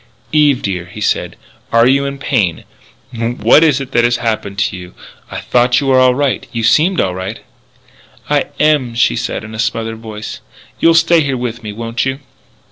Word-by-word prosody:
"Eve, 145 -4 +3
dear," 90 -3 -3
he 90 - -11
said, - - -1 0.4
"are 115 0 +4
you 135 +2 +3
in 140 0 -4
pain? 110 - -1 0.5
What 120 +6 +3
is 150 -4 +3
it 135 -1 -7
that 120 -2 +2
has 120 0 +2
happened 110 -4 -3
to 100 - 0
you? 90 0 -10 0.3
I - - -5
thought 125 +1 +2
you 140 - -3
were 130 -1 +4
all 130 -1 +4
right. 140 -1 -1
You 115 -1 -3
seemed 165 - +3
all 90 - +1
right 95 +1 -5 0.5
" - - -28
"I - - +1
am," 145 -6 +2
she 115 - +2
said - - -3
in 110 0 -9
a 110 - -7
smothered 115 0 -2
voice. 110 -1 -8 0.4
"You'll 165 0 +4
stay 165 0 +4
here 140 -3 -1
with 120 -2 -4
me, 105 -2 -6
won't 115 +2 -3
you?" 135 0 -2
120 Hz, 200 wpm, -15 LUFS, 110-140 Hz, 0.5 s, are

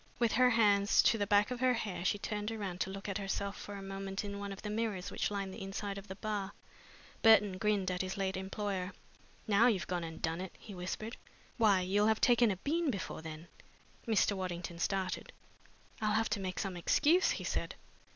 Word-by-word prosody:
With 235 -2 +2
her 250 0 +5
hands 205 -4 +4
to 225 - +4
the 205 - 0
back 205 +2 +4
of 250 - -3
her 255 0 +3
hair 200 -6 -3
she 195 - +2
turned 210 +1 -3
round 200 -5 -4
to - - 0
look 195 +1 -6
at 200 +1 -2
herself 200 0 -2
for 205 - -8
a 195 - -7
moment 195 +1 -4
in 200 0 -5
one 200 0 -5
of 195 - -8
the 210 - -3
mirrors 210 -4 -2
which - - -1
lined 200 -2 -3
the - - -8
inside 195 +1 -4
of 200 - -13
the 190 - -6
bar. 205 -1 -3 0.7
Burton 210 -4 +6
grinned 205 -3 +1
at 180 - -1
his 185 +1 -4
late 190 -1 -1
employer. 190 0 -3 0.5
"Now 215 +3 +5
you've 195 -9 +1
gone 175 +1 -2
and 160 -1 -7
done 165 +2 -1
it!" 190 - -7
he 210 - -11
whispered. 190 +5 -5 0.4
"Why, 210 -5 +4
you'll 200 +3 +2
have 220 0 +3
taken 240 -2 +5
a 195 - 0
bean 315 - 0
before 195 -8 -4
then!" 160 +1 -8 0.6
Mr. 215 -2 +3
Waddington 175 -2 -4
started. 190 0 -1 0.7
"I'll 215 -1 +1
have 225 0 +2
to 210 - 0
make 185 -1 -4
some 195 -2 -2
excuse," 305 - +3
he - - -6
said. - - -2
200 Hz, 210 wpm, -33 LUFS, 190-215 Hz, 0.7 s, Burton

